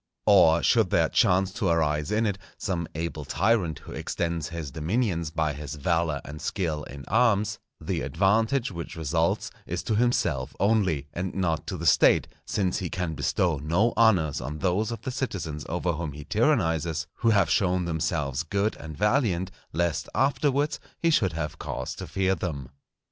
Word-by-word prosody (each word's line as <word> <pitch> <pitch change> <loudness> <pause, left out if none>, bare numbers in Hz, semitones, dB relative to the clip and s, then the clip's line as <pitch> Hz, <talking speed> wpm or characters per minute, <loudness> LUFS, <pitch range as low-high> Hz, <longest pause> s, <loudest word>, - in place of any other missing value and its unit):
Or 90 -5 +6
should 110 -6 +4
there - - +3
chance 95 +1 +3
to 100 - -1
arise 75 -3 +1
in 110 +2 +2
it 100 -2 -1 0.2
some 85 -5 -2
able 80 -1 -3
tyrant 90 +2 +1
who - - -10
extends 85 -2 -3
his 80 -4 -5
dominions 85 - -1
by 80 -2 -1
his 75 +1 -6
valour 80 0 0
and 75 +1 -8
skill 80 -6 -2
in 70 0 -9
arms, 105 -2 +2 0.2
the - - -2
advantage 110 +7 +1
which 85 -2 -6
results 80 +1 0 0.2
is 85 0 -3
to 110 - 0
himself 85 - +1
only, 95 -9 +2
and 90 +1 -4
not 85 -5 -1
to - - -3
the - - -5
State; - - +5 0.2
since 95 -2 0
he 90 -3 -3
can 90 -2 -2
bestow 80 0 0
no 85 +11 +1
honours 95 -10 +3
on 75 +4 -5
those 95 +5 0
of 115 -2 -6
the 130 - -3
citizens 85 - -4
over 90 +1 0
whom 80 -2 -4
he 75 0 -9
tyrannizes 85 - +1
who 115 - +2
have 100 -5 +4
shown 90 -3 +2
themselves 80 -5 -1
good 100 +6 -1
and 80 -1 -9
valiant, 105 -6 +1 0.2
lest 85 -1 -1
afterwards 140 +1 +1 0.2
he 165 - +2
should 95 - +2
have 75 -1 -4
cause - - -4
to - - -7
fear 95 0 +1
them. 75 -7 -4
85 Hz, 170 wpm, -26 LUFS, 80-105 Hz, 0.2 s, Or